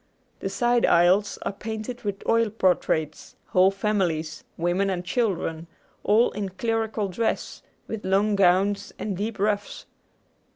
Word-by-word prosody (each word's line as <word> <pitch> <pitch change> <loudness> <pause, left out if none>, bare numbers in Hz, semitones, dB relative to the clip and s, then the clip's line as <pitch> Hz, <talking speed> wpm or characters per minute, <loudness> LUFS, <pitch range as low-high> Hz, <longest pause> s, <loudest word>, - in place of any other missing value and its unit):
The - - -3
side 240 -1 +1
aisles 180 +4 +4
are - - -1
painted 220 +4 -6
with 200 -2 -5
oil 230 -1 +3
portraits, 180 -7 0
whole 185 +1 +5
families, 185 -7 -1
women 175 +4 +1
and 180 -2 -3
children, 180 -7 -1 0.4
all 220 +4 +4
in 200 -2 -4
clerical 220 +1 -1
dress, 220 +5 -2 0.3
with 220 -2 -5
long 200 +2 +2
gowns 195 +2 +2
and 205 -3 -3
deep 210 +3 -3
ruffs. 205 0 -2
200 Hz, 130 wpm, -25 LUFS, 185-215 Hz, 0.4 s, whole